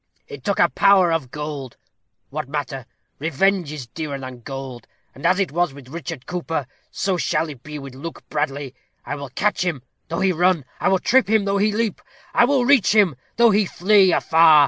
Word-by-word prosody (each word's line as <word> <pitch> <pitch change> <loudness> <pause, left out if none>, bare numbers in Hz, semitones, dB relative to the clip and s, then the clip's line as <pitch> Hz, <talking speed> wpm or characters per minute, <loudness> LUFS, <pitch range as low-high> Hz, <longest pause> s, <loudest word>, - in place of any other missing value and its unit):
It 140 -2 -10
took 200 - 0
a 175 - +5
power 190 -2 +4
of 155 -6 -2
gold. 145 -3 -6 0.5
What 130 - -4
matter? 135 -4 -4 0.3
Revenge 165 +2 +1
is 150 -5 -6
dearer 145 +3 -5
than 130 -2 -8
gold. 135 -1 -8 0.3
And 135 - -2
as 185 +1 +3
it 190 -7 0
was 170 -3 0
with 135 -3 -13
Richard 165 -3 -6
Cooper, 165 -5 -3 0.2
so 190 -1 -1
it - - -1
shall 160 -2 0
be 150 +4 -9
with 135 -2 -9
Luke 160 +6 -9
Bradley. 145 -3 -3 0.3
I 140 - -4
will 140 -2 -6
catch 205 +9 0
him, 160 -9 -2 0.2
though 165 - -3
he 190 0 +3
run. 175 -3 +2
I - - 0
will 190 - +4
trip 250 +5 +3
him, 220 -2 +3
though 200 0 +1
he 210 +1 +3
leap. 215 -1 -1 0.3
I - - +5
will 260 -1 +2
reach 250 -6 +4
him, 195 -9 +4 0.2
though 235 -1 +5
he 205 -1 +2
flee 190 +1 +4
afar. 160 -2 +6
165 Hz, 200 wpm, -22 LUFS, 140-195 Hz, 0.5 s, afar